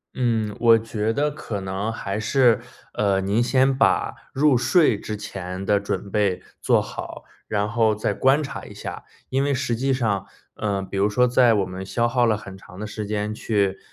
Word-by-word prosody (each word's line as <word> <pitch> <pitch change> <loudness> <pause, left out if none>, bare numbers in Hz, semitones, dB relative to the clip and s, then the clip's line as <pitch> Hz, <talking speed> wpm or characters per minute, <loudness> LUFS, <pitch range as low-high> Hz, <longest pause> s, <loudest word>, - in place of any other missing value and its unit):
嗯， 110 -4 0
我 115 -1 +6
觉 110 -1 -2
得 150 +5 0
可 115 -8 -5
能 95 +3 -3
还 100 -2 -4
是， 120 +1 +3 0.3
呃， 100 -2 +1
您 100 +4 +1
先 130 +2 +3
把 135 - +2 0.2
入 145 0 +3
睡 125 - +3
之 105 - -5
前 95 -1 -6
的 100 +1 +3
准 100 0 -4
备 100 -4 0 0.2
做 - - +4
好， - - -7 0.2
然 105 -1 0
后 110 -1 +2
再 105 -1 -1
观 135 +8 +3
察 140 - -6
一 - - -11
下。 - - -7 0.3
因 135 +1 +1
为 140 -1 +1
实 130 -3 -1
际 135 +4 0
上 105 -7 0 0.3
嗯， 100 -3 -2
比 100 - -5
如 105 +1 +3
说 125 +4 +3
在 120 -2 +4
我 100 -2 +1
们 95 +1 -6
消 115 +5 0
耗 120 0 +2
了 110 -2 +2
很 95 -2 -10
长 95 -1 -14
的 105 - -4
时 105 0 -5
间 105 0 -2
去， 100 -3 0
110 Hz, 210 characters per minute, -23 LUFS, 100-125 Hz, 0.3 s, 我